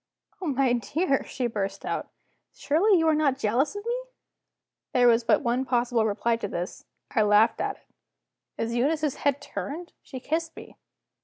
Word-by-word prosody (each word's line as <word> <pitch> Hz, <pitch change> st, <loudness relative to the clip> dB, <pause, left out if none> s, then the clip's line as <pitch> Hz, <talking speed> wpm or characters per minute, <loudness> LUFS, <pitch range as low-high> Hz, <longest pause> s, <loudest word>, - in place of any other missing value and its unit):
"Oh, 360 Hz, -, -3 dB
my 270 Hz, -3 st, +2 dB
dear," 275 Hz, -, 0 dB
she 255 Hz, -, -3 dB
burst 205 Hz, -4 st, -3 dB
out, -, -, -3 dB, 0.5 s
"surely 370 Hz, +7 st, +3 dB
you 325 Hz, -1 st, +2 dB
are 315 Hz, -, +5 dB
not 295 Hz, -3 st, +2 dB
jealous 265 Hz, -, +1 dB
of 410 Hz, +1 st, -6 dB
me?" 475 Hz, +1 st, 0 dB, 1.0 s
There 245 Hz, -1 st, +5 dB
was 230 Hz, 0 st, +4 dB
but 230 Hz, -, +3 dB
one 245 Hz, +1 st, +1 dB
possible 240 Hz, -3 st, +1 dB
reply 230 Hz, +2 st, 0 dB
to 215 Hz, -, -4 dB
this: 175 Hz, -1 st, -5 dB, 0.3 s
I 230 Hz, -, +2 dB
laughed 210 Hz, +2 st, +4 dB
at -, -, -1 dB
it. -, -, -26 dB, 0.7 s
Is 230 Hz, +1 st, -2 dB
Eunice's 295 Hz, +4 st, 0 dB
head 285 Hz, -1 st, +1 dB
turned? 320 Hz, +4 st, -6 dB
She 260 Hz, -, -8 dB
kissed 325 Hz, +5 st, -2 dB
me! -, -, -11 dB
260 Hz, 170 wpm, -26 LUFS, 230-310 Hz, 1.0 s, are